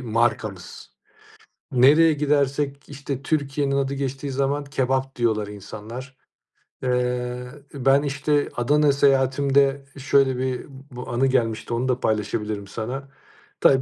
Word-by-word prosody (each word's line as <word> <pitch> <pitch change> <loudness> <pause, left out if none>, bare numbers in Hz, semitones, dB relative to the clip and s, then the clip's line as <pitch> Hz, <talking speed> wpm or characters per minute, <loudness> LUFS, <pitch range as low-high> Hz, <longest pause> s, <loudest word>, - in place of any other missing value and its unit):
markamız. 110 -6 -2 0.8
Nereye 150 +6 +6
gidersek, 140 -1 0
işte, 140 -1 -5
Türkiye'nin 140 -2 0
adı 140 0 0
geçtiği 135 0 -3
zaman 140 +2 0
"kebap" 135 -1 -1
diyorlar 110 -4 +1
insanlar. 110 +6 -9 0.7
Eee, 125 0 -1 0.3
ben, 135 +1 +3
işte, 145 +1 0
Adana 145 +4 +3
seyahatimde 140 0 +2
şöyle 135 -1 +2
bir 130 -1 -2 0.3
bu 125 +1 -8
anı 125 +3 +2
gelmişti, 115 -3 0
onu 120 +2 0
da 125 -1 +1
paylaşabilirim 105 -2 -2
sana. 125 +7 -5 0.5
Tabii, 135 -1 +5
135 Hz, 115 wpm, -23 LUFS, 125-140 Hz, 0.8 s, Nereye